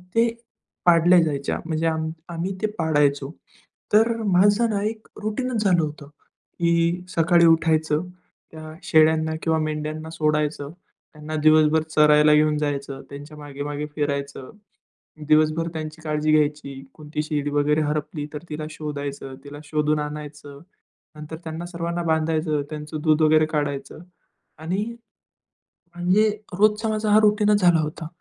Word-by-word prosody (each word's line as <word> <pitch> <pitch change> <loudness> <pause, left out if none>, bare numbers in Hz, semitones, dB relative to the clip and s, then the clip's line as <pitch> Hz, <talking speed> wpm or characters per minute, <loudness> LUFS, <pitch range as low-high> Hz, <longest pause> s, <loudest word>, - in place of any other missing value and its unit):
ते 230 +1 +4 0.6
पाडल्या 175 +1 +6
जायच्या, 140 -3 -2
म्हणजे 165 0 -1
आम 160 -1 -1 0.2
आम्ही 175 +3 -4
ते 215 - +1
पाडायचो. 145 -3 +1 0.6
तर 225 +2 +5
माझं 205 +4 +3
ना 205 -2 -1
एक 220 +1 -4 0.2
रुटीनच 220 +1 -2
झालं 180 -4 +3
होतं 150 -1 -6 0.5
की 170 +1 +1
सकाळी 170 +1 +4
उठायचं, 160 -2 +2
अ, 180 - -9 0.4
त्या 155 0 -10
शेळ्यांना 160 0 +3
किंवा 160 -1 +1
मेंढ्यांना 155 0 -4
सोडायचं, 150 -2 -1 0.4
त्यांना 155 0 -7
दिवसभर 155 0 +5
चरायला 150 0 +6
घेऊन 150 0 +3
जायचं, 140 -2 -3
त्यांच्या 145 +2 -10
मागे-मागे 145 0 -5
फिरायचं, 140 -2 -3 0.8
दिवसभर 155 +2 +3
त्यांची 155 0 -6
काळजी 155 -1 -1
घ्यायची. 150 -3 0
कोणती 150 -1 -5
शेळी 145 -1 -2
वगैरे 145 +1 +2
हरपली 150 0 -3
तर 150 - -7
तिला 155 0 -5
शोधायचं, 145 -3 -6
तिला 145 0 -10
शोधून 150 0 0
आणायचं. 150 -1 -7 0.6
नंतर 150 +1 -8
त्यांना 160 +1 -6
सर्वांना 170 0 -4
बांधायचं. 160 -1 0
त्यांचं 150 0 -6
दूध 155 -1 +3
वगैरे 155 0 +4
काढायचं 145 -3 -3 0.6
आणि 180 +6 -2 1.1
म्हणजे 185 +5 +2 0.3
रोजचा 215 +1 +3
माझा 215 0 -1
हा 210 - +7
रुटीनच 210 0 +3
झाला 175 -3 +5
होता. 155 +1 -5
155 Hz, 130 wpm, -23 LUFS, 150-170 Hz, 1.1 s, हा